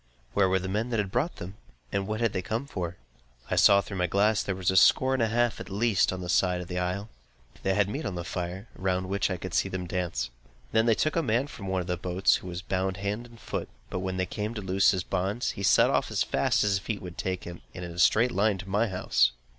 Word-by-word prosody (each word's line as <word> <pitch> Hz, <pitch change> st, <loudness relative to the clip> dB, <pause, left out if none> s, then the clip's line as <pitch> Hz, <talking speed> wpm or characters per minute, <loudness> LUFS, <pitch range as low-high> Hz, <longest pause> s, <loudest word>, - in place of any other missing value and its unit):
Where 95 Hz, -2 st, +3 dB
were 95 Hz, -, +3 dB
the 95 Hz, 0 st, -3 dB
men 105 Hz, +5 st, -1 dB
who 115 Hz, -, 0 dB
had 100 Hz, -3 st, -1 dB
brought 135 Hz, -, 0 dB
them? 95 Hz, +3 st, -8 dB, 0.3 s
And 100 Hz, -1 st, -1 dB
what 110 Hz, +1 st, -2 dB
had 115 Hz, -3 st, +1 dB
they 95 Hz, -, -1 dB
come 110 Hz, +7 st, -3 dB
for? 90 Hz, -9 st, -5 dB, 0.5 s
I -, -, +2 dB
saw 100 Hz, 0 st, +6 dB
through 100 Hz, -1 st, -7 dB
my 90 Hz, -, +2 dB
glass 105 Hz, +3 st, +3 dB
that -, -, -8 dB
there 95 Hz, -, 0 dB
were 95 Hz, -, -8 dB
a 95 Hz, +1 st, +2 dB
score 130 Hz, +7 st, +5 dB
and 130 Hz, -, +1 dB
a 115 Hz, -, +3 dB
half, 120 Hz, 0 st, +1 dB
at -, -, -8 dB
least, 105 Hz, 0 st, +2 dB
on 95 Hz, 0 st, -4 dB
the -, -, -5 dB
east 90 Hz, -, +4 dB
side 90 Hz, -1 st, 0 dB
of 90 Hz, -, -6 dB
the 90 Hz, 0 st, -3 dB
isle. 90 Hz, +4 st, -2 dB, 0.5 s
They 95 Hz, 0 st, +1 dB
had 105 Hz, -1 st, +3 dB
meat 140 Hz, +10 st, -4 dB
on 95 Hz, -, -3 dB
the 85 Hz, -, -3 dB
fire, 90 Hz, +4 st, -5 dB
round 95 Hz, 0 st, -1 dB
which 100 Hz, +1 st, 0 dB
I 95 Hz, -, -2 dB
could 95 Hz, 0 st, -7 dB
see 95 Hz, -, +2 dB
them 95 Hz, -1 st, -4 dB
dance. 85 Hz, -9 st, -2 dB, 0.4 s
They 110 Hz, -, +4 dB
then 115 Hz, -1 st, +3 dB
took 155 Hz, -, 0 dB
a 165 Hz, -, +3 dB
man 125 Hz, -2 st, +1 dB
from 110 Hz, -9 st, -9 dB
one 95 Hz, -1 st, 0 dB
of 90 Hz, -, -7 dB
the 90 Hz, -1 st, -1 dB
boats, 90 Hz, +2 st, +2 dB
who -, -, -10 dB
was 90 Hz, 0 st, -5 dB
bound 95 Hz, +1 st, -1 dB
hand 105 Hz, +4 st, -3 dB
and 115 Hz, -1 st, -16 dB
foot; -, -, -4 dB, 0.2 s
but 90 Hz, -, -2 dB
when 95 Hz, 0 st, -3 dB
they 95 Hz, -, +1 dB
came 105 Hz, +5 st, -4 dB
to 105 Hz, -, -4 dB
loose 95 Hz, 0 st, +3 dB
his 95 Hz, -3 st, +1 dB
bonds, 95 Hz, +6 st, -1 dB
he -, -, -8 dB
set 100 Hz, -, +5 dB
off -, -, +1 dB
as -, -, +1 dB
fast -, -, +1 dB
as 105 Hz, -, +2 dB
his 95 Hz, -, +2 dB
feet 100 Hz, 0 st, -4 dB
would 90 Hz, -2 st, -8 dB
take 95 Hz, -1 st, -2 dB
him, 85 Hz, 0 st, -8 dB
and 90 Hz, -, -5 dB
in 85 Hz, -, -7 dB
a 85 Hz, -, -8 dB
straight 115 Hz, +7 st, +4 dB
line 100 Hz, 0 st, +2 dB
to 95 Hz, +1 st, -8 dB
my 105 Hz, +4 st, +1 dB
house. 90 Hz, -, +2 dB
95 Hz, 280 wpm, -28 LUFS, 90-110 Hz, 0.5 s, saw